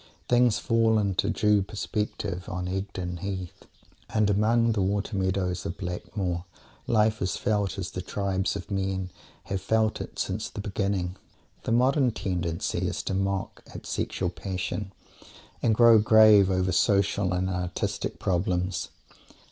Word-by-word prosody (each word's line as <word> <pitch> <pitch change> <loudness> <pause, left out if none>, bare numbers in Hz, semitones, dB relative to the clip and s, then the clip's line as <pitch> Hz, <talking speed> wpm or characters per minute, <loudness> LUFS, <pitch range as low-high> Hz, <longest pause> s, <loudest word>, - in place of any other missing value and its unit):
Things 120 -3 +4
fall 115 -1 +2
into 100 -1 +1
due 105 -1 +3
perspective 100 -2 -3
on 90 0 -3
Egdon 90 -2 -4
Heath, 95 -1 -6 0.4
and 110 -2 +2
among 115 +3 +3
the 105 -3 0
water 100 +3 -1
meadows 95 -1 -1
of 100 -1 -5
Blackmoor 90 -1 -3 0.4
life 110 -1 +2
is 90 -2 -1
felt 100 -4 0
as - - -4
the - - -4
tribes 95 -1 -1
of - - -7
men 95 -1 -2 0.3
have 95 -1 -3
felt 110 +2 +1
it - - -8
since 100 +3 -2
the - - -8
beginning. 100 -3 -2 0.5
The - - -1
modern 130 +3 +3
tendency 85 -6 -2
is - - -3
to - - -2
mock 95 0 -2
at - - -8
sexual 90 -2 -2
passion 95 +2 -4 0.7
and 115 -2 +3
grow 115 -1 +7
grave 105 -2 +7
over 95 0 +1
social 100 +1 +2
and 90 0 0
artistic 90 -2 -3
problems. 90 -1 -1
100 Hz, 140 wpm, -27 LUFS, 95-105 Hz, 0.7 s, grow